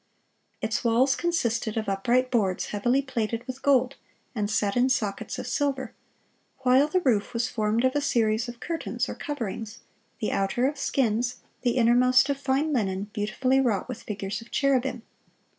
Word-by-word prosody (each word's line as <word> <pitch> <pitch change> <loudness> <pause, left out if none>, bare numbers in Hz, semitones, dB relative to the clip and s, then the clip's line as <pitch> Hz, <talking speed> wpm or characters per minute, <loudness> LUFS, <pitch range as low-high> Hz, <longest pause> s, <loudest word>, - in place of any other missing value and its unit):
Its 220 - -1
walls 250 +4 +3
consisted 235 -11 -1
of 220 - -2
upright 240 +6 +1
boards 200 -7 0
heavily 245 +7 +1
plated 230 -2 -3
with 255 +1 -7
gold, 265 -1 +2 0.4
and 210 -4 -1
set 205 -1 0
in 250 +1 +3
sockets 210 -6 -1
of - - -5
silver, 280 -2 -1 0.7
while 260 +3 +4
the 365 +4 +1
roof 230 -7 +1
was 230 +1 +1
formed 220 0 0
of 260 - +2
a 290 - +2
series 225 -4 +1
of 240 -1 -9
curtains, 330 +3 -3
or - - -4
coverings, 225 -6 -5 0.4
the 215 - -1
outer 195 +6 +1
of 290 - -2
skins, 245 -2 0 0.2
the 245 0 +1
innermost 250 +3 +4
of 275 - -3
fine 280 +3 0
linen 200 -4 -1
beautifully 255 +5 +1
wrought 225 -7 0
with - - -6
figures 200 0 -4
of 230 - -14
cherubim. 265 -3 +1
240 Hz, 165 wpm, -26 LUFS, 215-265 Hz, 0.7 s, while